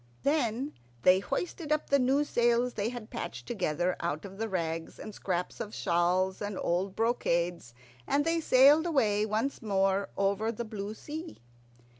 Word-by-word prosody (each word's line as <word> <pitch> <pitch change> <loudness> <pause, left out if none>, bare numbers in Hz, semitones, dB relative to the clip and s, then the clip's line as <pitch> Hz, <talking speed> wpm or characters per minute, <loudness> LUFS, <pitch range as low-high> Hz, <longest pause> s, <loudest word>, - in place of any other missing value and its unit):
Then 280 -2 0 0.3
they 185 +1 +6
hoisted 325 - -4
up 305 -1 0
the 280 - +5
new 270 +3 +3
sails 240 -2 +2
they 210 +1 -1
had 240 -3 -8
patched 235 - -5
together 180 -5 -1
out 150 +5 -3
of 195 +1 -10
the 225 0 -2
rags 165 -3 -3
and 215 - -8
scraps 180 -3 -3
of 210 - -5
shawls 180 +2 +1
and 205 -2 -3
old 185 +3 -1
brocades, 175 - 0 0.3
and 290 +1 +2
they 330 0 +2
sailed 295 +3 +6
away 215 -9 +2
once 220 +6 -1
more 195 -1 +1
over 200 +3 +1
the 235 +1 -5
blue 210 -1 -5
sea. 315 +6 -7
215 Hz, 160 wpm, -30 LUFS, 190-255 Hz, 0.3 s, they